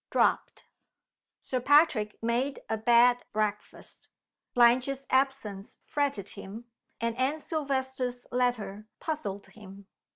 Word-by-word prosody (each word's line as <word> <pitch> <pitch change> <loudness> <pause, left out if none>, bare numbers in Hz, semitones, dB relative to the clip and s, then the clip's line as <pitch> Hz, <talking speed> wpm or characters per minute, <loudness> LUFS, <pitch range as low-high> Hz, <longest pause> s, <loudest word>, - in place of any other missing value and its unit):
DROPPED. - - +1 0.7
SIR 255 - -3
PATRICK 260 -7 +3
made 245 +4 0
a 220 - 0
bad 240 +2 +4
breakfast. 210 -1 -4 0.5
Blanche's 255 +3 +3
absence 260 -7 -1
fretted 280 -10 -1
him, 205 +3 -9 0.3
and 230 0 -1
Anne 265 +4 +1
Silvester's 265 -5 -3
letter 230 -5 -1
puzzled 205 -12 -4
him. 200 -2 -13
245 Hz, 100 wpm, -29 LUFS, 215-270 Hz, 0.7 s, bad